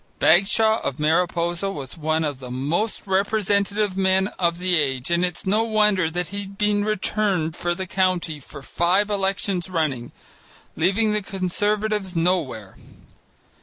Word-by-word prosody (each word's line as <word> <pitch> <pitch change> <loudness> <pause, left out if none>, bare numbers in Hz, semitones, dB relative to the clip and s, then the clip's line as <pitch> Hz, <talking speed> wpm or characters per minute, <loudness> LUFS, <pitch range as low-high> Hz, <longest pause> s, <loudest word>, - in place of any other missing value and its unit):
Bagshaw 210 +6 +4
of 140 - -3
Mariposa 170 +3 +1
was 140 -8 -7
one 160 0 0
of 145 -4 -3
the 125 -2 -9
most 150 - -2
representative 200 0 0
men 190 0 +2
of 170 -2 +1
the 180 0 +1
age, 135 -3 -1
and 170 +1 +2
it's 180 -1 -3
no 205 +3 +2
wonder 210 -6 +2
that 175 +1 -3
he 200 +2 -5
had 195 0 -8
been 210 0 +1
returned 195 -5 0
for 175 0 -1
the 190 0 -4
county 185 -4 0
for 140 +1 -12
five 185 +8 +1
elections 195 -2 -1
running, 150 -9 -2 0.6
leaving 200 +6 +2
the 210 - 0
Conservatives 205 +1 -1
nowhere. 165 - -1
185 Hz, 145 wpm, -23 LUFS, 160-200 Hz, 0.6 s, Bagshaw